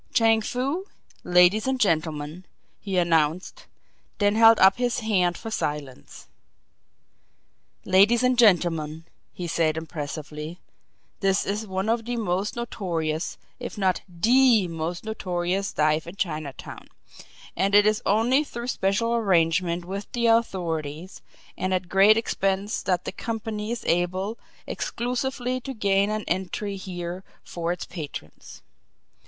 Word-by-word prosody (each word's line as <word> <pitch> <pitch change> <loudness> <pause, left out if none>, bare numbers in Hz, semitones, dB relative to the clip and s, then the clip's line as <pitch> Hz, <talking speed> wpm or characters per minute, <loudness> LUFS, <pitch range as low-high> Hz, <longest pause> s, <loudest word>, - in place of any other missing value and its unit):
"Chang 225 -1 +4
Foo 275 - -2 0.4
ladies 180 +6 +4
and 265 -1 0
gentlemen," 160 -3 -1 0.3
he 195 -3 -3
announced; 165 0 0 0.5
then 205 -1 +2
held 225 0 +7
up 190 +3 +6
his 245 0 0
hand 185 -6 +1
for 225 - -7
silence. 145 -9 -5 1.6
"Ladies 205 +6 +4
and 250 0 +3
gentlemen," 165 -8 +2 0.3
he 180 - -6
said 160 -2 0
impressively, 155 0 -6 0.6
"this 195 -1 +1
is 210 +2 -3
one 190 +1 -2
of 225 0 0
the 240 0 -3
most 200 -2 -1
notorious, 170 -9 -3 0.2
if 245 -2 -7
not 190 -3 +1
THE 225 +3 +4
most 165 +1 -4
notorious 190 -2 -2
dive 155 +1 +1
in 170 - -8
Chinatown, 155 -7 -5 0.7
and 195 +1 +1
it 205 0 +7
is 215 +2 +2
only 235 +8 +3
through 240 -4 -6
special 220 +2 0
arrangement 175 -5 +1
with 195 +3 -6
the 240 -2 0
authorities 175 -7 -1 0.3
and 185 0 -1
at 180 -1 -3
great 200 +3 +6
expense 195 -1 -1
that 180 -2 -1
the - - -3
company 220 -2 -4
is 235 - -4
able 185 +5 0 0.3
exclusively 250 +1 -2
to 270 +1 -6
gain 200 -1 +2
an 215 0 -2
entree 190 +3 -2
here 180 -1 -6 0.2
for 170 0 -3
its 180 - -4
patrons. 150 - -9
190 Hz, 130 wpm, -25 LUFS, 170-225 Hz, 1.6 s, held